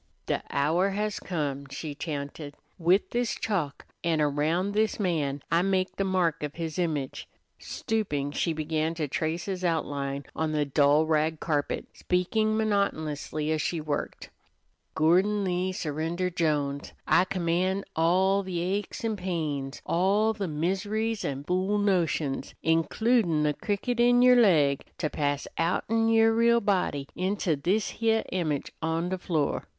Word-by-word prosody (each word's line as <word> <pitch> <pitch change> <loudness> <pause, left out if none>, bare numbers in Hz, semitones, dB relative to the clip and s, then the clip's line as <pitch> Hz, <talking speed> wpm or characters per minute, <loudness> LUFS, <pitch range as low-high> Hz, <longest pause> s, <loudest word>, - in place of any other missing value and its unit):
"De - - -1
hour 160 +7 +2
has 210 +1 -2
come," 140 -6 -3
she 145 +2 -5
chanted. 145 -1 -5 0.2
"With 180 +4 +3
this 240 -1 0
chalk, 170 -10 -2 0.2
an' 165 -2 +1
around 155 +6 +1
this 215 +1 +1
man, 150 -8 -1
I 170 +1 +4
make 185 0 0
the 195 - +1
mark 180 -4 +1
of 150 -1 -4
his 165 -1 -4
image." 150 -6 -2 0.3
Stooping, 150 -11 -2
she 165 - 0
began 155 +1 -1
to 155 -3 -2
trace 160 +4 -2
his 185 -2 -4
outline 140 -5 -1
on 160 -1 -1
the 150 -1 +1
dull 145 +2 +4
rag 155 0 +1
carpet, 145 -3 -1
speaking 215 +5 0
monotonously 160 -8 -1
as 155 -1 +1
she 170 - -1
worked: 150 -1 -4 0.6
"Gordon 185 +6 +3
Lee 185 0 0
Surrender 165 +2 -2
Jones, 145 -4 -1
I 180 - +5
command 185 +1 0
all 185 +4 +3
the 185 -3 -4
aches 195 +5 -2
an' 220 -2 -1
the - - -13
pains, 150 -7 -3
all 200 +5 +2
the 205 -3 -3
miseries 200 +8 -1
an' 140 0 -3
fool 185 +5 0
notions, 165 -9 0
includin' 165 +1 +2
the 150 0 +2
cricket 220 - -2
in 245 +1 +5
yer 250 0 +8
leg, 155 - +4
to 155 -3 -2
pass 145 -1 -1
outen 225 +7 +1
yer 225 0 +5
real 235 +1 +4
body 180 -9 0
into 185 -3 0
this 185 +10 0
heah 225 -1 +1
image 155 -6 -1
on 165 +2 -1
the 185 0 -2
floor. 160 -5 -1
170 Hz, 150 wpm, -27 LUFS, 150-195 Hz, 0.6 s, yer